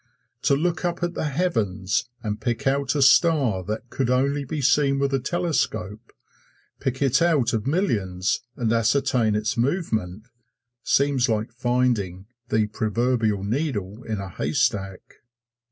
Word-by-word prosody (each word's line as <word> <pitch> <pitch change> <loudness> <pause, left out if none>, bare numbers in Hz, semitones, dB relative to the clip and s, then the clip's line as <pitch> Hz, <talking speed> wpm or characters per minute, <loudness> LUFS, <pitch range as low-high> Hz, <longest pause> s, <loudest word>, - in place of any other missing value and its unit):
To 140 0 +3
look 165 +4 -1
up 175 0 -2
at 175 0 -1
the 155 - -2
heavens 115 - -1
and 105 -1 -3
pick 120 +5 -2
out 135 +1 +1
a 140 - +3
star 140 - +4
that 110 +4 -5
could 130 -3 -1
only 140 +3 +1
be 150 +3 -4
seen 140 0 +3
with 140 0 0
a 135 - +2
telescope 125 - -2 0.7
pick 130 +1 -1
it 135 +1 +3
out 160 -8 +2
of 110 +2 -1
millions 100 - 0
and 115 -2 0
ascertain 115 -1 +2
its 105 +2 -1
movement 115 - -1 0.5
seems 140 -3 +2
like 110 +1 -1
finding 120 -7 0 0.2
the 110 0 +2
proverbial 110 0 0
needle 110 -3 -2
in 110 -3 -4
a 100 - -5
haystack. 100 - -2
125 Hz, 140 wpm, -24 LUFS, 105-140 Hz, 0.7 s, star